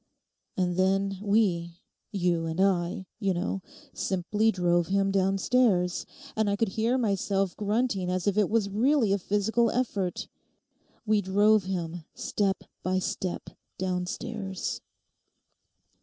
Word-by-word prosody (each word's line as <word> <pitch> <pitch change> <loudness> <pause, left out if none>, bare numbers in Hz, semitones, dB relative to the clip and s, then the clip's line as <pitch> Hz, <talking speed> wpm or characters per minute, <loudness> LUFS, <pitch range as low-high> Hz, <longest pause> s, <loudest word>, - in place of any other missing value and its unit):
'And 180 -1 0
then, 195 +1 +1
we—you 180 -3 -1
and 160 +2 -4
I, 190 -1 +1
you 195 -4 +1
know—simply 195 +3 -1
drove 175 -3 +1
him 195 0 +1
downstairs, 195 -1 +2 0.3
and 220 -1 +1
I 200 - +1
could 220 0 0
hear 225 +6 +1
myself 195 -4 0
grunting 210 -3 0
as 180 0 -1
if 200 -2 +2
it 210 -2 +3
was 220 -2 +2
really 225 +1 +2
a 200 - +1
physical 220 +5 +1
effort; 205 -7 -1 0.8
we 215 -1 +3
drove 205 +2 +3
him, 175 -3 -3
step 195 -2 -1 0.2
by 185 0 0
step, 185 -1 -3 0.3
downstairs. 190 +2 -3
195 Hz, 115 wpm, -28 LUFS, 180-210 Hz, 0.8 s, it